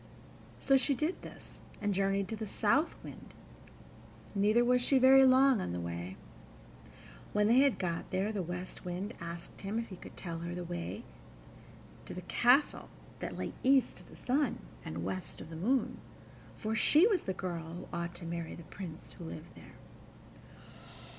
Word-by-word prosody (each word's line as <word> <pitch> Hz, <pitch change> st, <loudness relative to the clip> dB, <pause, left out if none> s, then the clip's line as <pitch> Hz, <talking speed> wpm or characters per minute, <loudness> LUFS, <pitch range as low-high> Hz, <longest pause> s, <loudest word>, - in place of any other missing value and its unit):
So 270 Hz, -1 st, +4 dB
she 275 Hz, +1 st, +1 dB
did 310 Hz, +7 st, -1 dB
this, -, -, -11 dB, 0.2 s
and 205 Hz, -1 st, 0 dB
journeyed 195 Hz, 0 st, +1 dB
to 220 Hz, -, -2 dB
the 220 Hz, 0 st, -5 dB
South 250 Hz, -, +2 dB
Wind, -, -, -11 dB, 1.0 s
neither 215 Hz, +4 st, +4 dB
was 250 Hz, 0 st, +4 dB
she 270 Hz, +2 st, +4 dB
very 265 Hz, +1 st, +8 dB
long 260 Hz, -3 st, +5 dB
on 85 Hz, -, -3 dB
the 90 Hz, -, -2 dB
way. 85 Hz, +2 st, -5 dB, 1.2 s
When 210 Hz, 0 st, +3 dB
they 235 Hz, +4 st, +6 dB
had 275 Hz, -2 st, +4 dB
got 170 Hz, -3 st, -3 dB
there, 190 Hz, +3 st, 0 dB
the 205 Hz, -3 st, -2 dB
West 180 Hz, +1 st, -6 dB
Wind 180 Hz, +5 st, -4 dB
asked 170 Hz, 0 st, -8 dB
him 200 Hz, +3 st, -3 dB
if 230 Hz, 0 st, -3 dB
he 190 Hz, -, -7 dB
could -, -, -12 dB
tell 165 Hz, -3 st, -5 dB
her 170 Hz, +1 st, -4 dB
the 180 Hz, -, -4 dB
way 175 Hz, +6 st, -5 dB, 1.0 s
to -, -, -7 dB
the -, -, -5 dB
castle 250 Hz, +5 st, +3 dB, 0.3 s
that -, -, -5 dB
lay -, -, -3 dB
east 265 Hz, 0 st, +3 dB
of -, -, -16 dB
the -, -, -13 dB
sun 270 Hz, 0 st, 0 dB, 0.3 s
and 85 Hz, +2 st, -5 dB
west 95 Hz, 0 st, -4 dB
of 160 Hz, -, -9 dB
the -, -, -6 dB
moon, 235 Hz, +10 st, 0 dB, 0.6 s
for 220 Hz, 0 st, -2 dB
she 305 Hz, -, +6 dB
was 405 Hz, -6 st, +2 dB
the 190 Hz, -, 0 dB
girl 170 Hz, -3 st, -4 dB
who 175 Hz, -, -8 dB
ought 170 Hz, 0 st, -3 dB
to 175 Hz, -, -9 dB
marry 170 Hz, -1 st, -4 dB
the 170 Hz, -, -10 dB
Prince 165 Hz, 0 st, -9 dB
who 170 Hz, -, -9 dB
lived 160 Hz, 0 st, -8 dB
there. -, -, -14 dB
195 Hz, 180 wpm, -32 LUFS, 170-250 Hz, 1.2 s, very